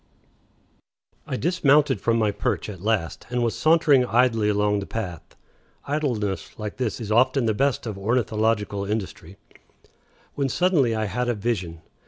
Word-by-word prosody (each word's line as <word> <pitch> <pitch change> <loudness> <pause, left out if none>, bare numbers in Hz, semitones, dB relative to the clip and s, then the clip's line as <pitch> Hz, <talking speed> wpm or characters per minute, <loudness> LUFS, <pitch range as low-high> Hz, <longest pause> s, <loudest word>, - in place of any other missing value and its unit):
I 130 - -3
dismounted 150 -4 +2
from 115 0 +1
my 110 -2 +2
perch 100 +1 -2
at 95 -4 -8
last, 105 -5 -2
and 125 0 -1
was 115 - 0
sauntering 155 -5 +4
idly 115 -3 +2
along 105 0 +1
the 100 - -6
path 90 -8 -6 0.5
(idleness 120 -10 -2
like 105 -1 -6
this 125 -5 -2
is 110 -2 -5
often 125 +3 +3
the 110 - +2
best 135 +4 0
of 105 -4 -5
ornithological 110 -2 0
industry), 100 -3 -5 1.0
when 140 -1 -1
suddenly 150 -7 +2
I 110 0 -1
had 120 +5 -2
a 120 - 0
vision! 95 -7 -3
115 Hz, 150 wpm, -24 LUFS, 105-130 Hz, 1.0 s, sauntering